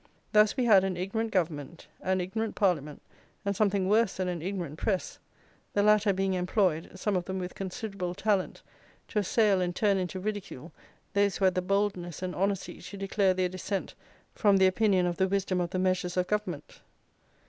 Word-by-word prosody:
Thus 210 +2 +4
we 255 - +2
had 200 -5 +6
an 190 -2 -1
ignorant 220 +5 -2
Government, 165 -3 -2 0.2
an 190 0 0
ignorant 220 +4 -3
Parliament, 150 -7 0 0.4
and 200 0 0
something 200 -2 +1
worse 215 0 +3
than 185 -1 -1
an 175 -3 -3
ignorant 175 -4 -4
press; 190 -4 -2 0.5
the 205 - +2
latter 210 0 +4
being 195 0 0
employed 180 -2 +1
(some 200 +2 -1
of 180 -1 -1
them 190 0 -4
with 180 -1 -4
considerable 195 -2 -5
talent) 200 -1 0 0.5
to 210 - 0
assail 205 -1 +2
and 175 -1 -1
turn 200 -3 +2
into 185 0 -3
ridicule 190 -6 -5 0.4
those 200 -1 +2
who 195 - +1
had 185 - +4
the 185 - 0
boldness 185 -3 -1
and 180 -1 -3
honesty 195 0 -2
to 200 - -9
declare 195 -1 +1
their 185 0 +1
dissent 185 +2 -4 0.4
from 200 -2 +4
the 190 - +5
opinion 185 -1 +3
of 175 -1 -1
the 190 - +2
wisdom 190 -1 0
of 175 - -2
the 185 - -3
measures 185 -1 0
of 180 - +2
Government. 185 -7 -4
190 Hz, 185 wpm, -29 LUFS, 180-205 Hz, 0.5 s, had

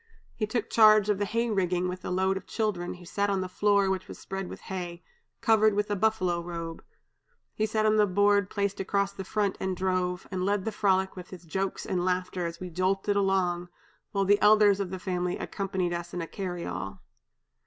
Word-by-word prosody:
He 215 - -2
took 230 +2 -2
charge 215 -2 +6
of 200 - -1
the 205 - +1
'hay 230 +3 0
rigging' 180 -3 +1
with 180 0 -5
the - - -5
load 190 +1 +1
of 190 - -6
children, 200 -6 -2
who 180 0 -13
sat 200 +3 -1
on 195 -1 +1
the 185 - -3
floor 200 +1 +2
which 190 0 -1
was - - -9
spread 195 -1 -5
with - - -9
hay, 175 -2 -6 0.4
covered 215 -3 +4
with 205 +1 0
a - - +2
buffalo 185 -4 +1
robe; 170 -1 -6 0.7
he 215 - 0
sat 215 0 0
on 215 0 +4
a 210 - +5
board 200 +1 +3
placed 200 -1 -1
across 200 +1 0
the 195 - -6
front 200 0 -1
and 190 -1 -2
drove, 185 -1 -1
and 185 -1 -2
led 200 0 0
the 220 - -1
frolic 190 -2 +1
with 180 -1 -9
his 180 -2 -10
jokes 190 +3 -3
and 180 -2 -1
laughter 180 -1 -1
as 170 0 -7
we 180 -1 -6
jolted 190 +3 0
along, 185 -3 +1 0.4
while 195 -1 +1
the 205 +1 +4
elders 210 -1 +6
of 195 -2 -2
the 190 - -4
family 180 -1 -2
accompanied 190 -3 -2
us 175 0 -5
in 175 - -2
a - - -3
'carryall.' 130 - -5
190 Hz, 210 wpm, -28 LUFS, 180-205 Hz, 0.7 s, charge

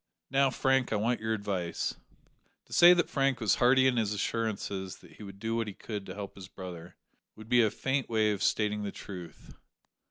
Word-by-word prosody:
Now, 135 0 +4
Frank, 130 -1 +1
I - - +1
want 115 +4 0
your 110 0 -1
advice." 100 -5 -2 0.7
To - - -13
say 175 +1 +8
that 175 - +1
Frank 135 -2 +1
was 110 -4 +2
hearty 130 +2 +5
in 130 -2 +3
his 105 -2 +1
assurances 100 -3 -3
that - - -18
he - - -14
would 100 -1 -9
do 115 +3 -2
what 115 -1 -1
he 100 - -6
could 105 -3 -6
to 95 - -7
help 100 -1 -6
his 95 -1 -10
brother, 90 -3 -9 0.4
would 110 +1 -13
be 125 -1 +5
a 110 - +4
faint 135 +4 -2
way 110 -2 +2
of 100 - -3
stating 105 -1 +1
the 100 -1 -3
truth. 90 -4 -10
110 Hz, 210 wpm, -30 LUFS, 100-125 Hz, 0.7 s, say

